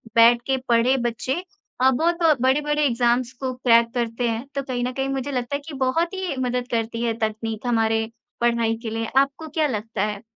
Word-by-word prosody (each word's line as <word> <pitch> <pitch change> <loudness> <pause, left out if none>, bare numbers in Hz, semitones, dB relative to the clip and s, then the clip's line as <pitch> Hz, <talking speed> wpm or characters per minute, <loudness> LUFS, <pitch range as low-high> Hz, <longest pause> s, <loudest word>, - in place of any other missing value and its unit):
बैठ 235 +1 +6
के 265 0 +2
पढ़े 240 +3 +4
बच्चे 260 - -3 0.4
अ, 260 - +6
बहुत 335 +6 +1 0.2
बड़े-बड़े 295 +3 +2
एग्ज़ाम्स 240 0 +1
को 260 -1 -2
क्रैक 235 -2 +4
करते 235 0 -1
हैं। 230 +3 -3
तो 275 - 0
कहीं 250 -2 -3
न 250 - -1
कहीं 270 +1 -2
मुझे 270 +1 -2
लगता 250 +2 -2
है 285 - -3
कि 310 - -7
बहुत 330 +8 +1
ही 375 -6 -3
मदद 250 -1 -1
करती 230 0 -1
है, 230 -1 +1
तकनीक 220 +1 -3
हमारे 225 -1 +2 0.4
पढ़ाई 235 -1 +2
के 225 - -3
लिए 225 +1 -2
आपको 275 +4 +1
क्या 305 -1 +3
लगता 220 -4 -3
है? 210 +1 -5
245 Hz, 195 wpm, -23 LUFS, 230-270 Hz, 0.4 s, बैठ